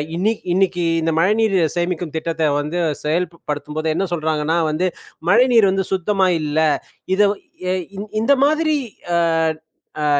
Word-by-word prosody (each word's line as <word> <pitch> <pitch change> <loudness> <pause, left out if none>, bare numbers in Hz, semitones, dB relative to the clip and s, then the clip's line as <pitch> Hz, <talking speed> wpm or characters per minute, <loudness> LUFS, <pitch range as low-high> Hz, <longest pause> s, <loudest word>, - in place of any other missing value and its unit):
இன்னிக்கு 210 +6 0
இன்னைக்கு 185 -1 +1 0.2
இந்த 165 0 0
மழைநீர் 210 +3 +2 0.2
சேமிக்கும் 175 -2 -2
திட்டத்தை 160 0 -1
வந்து 150 +4 -3 0.2
செயல்ப்படுத்தும்போது 155 -1 -2
என்ன 195 - 0
சொல்றாங்கன்னா 155 0 0
வந்து, 175 +5 0 0.4
மழைநீர் 230 -1 +5
வந்து 190 0 0
சுத்தமா 190 +1 +1
இல்ல. 150 0 -1 0.6
இதை 205 +1 +4 0.4
எ - - +2 0.5
இந்த 240 +5 +4
மாதிரி 310 +1 +2 0.4
அ - - +3 0.9
அ - - +1
175 Hz, 125 wpm, -20 LUFS, 160-200 Hz, 0.9 s, மழைநீர்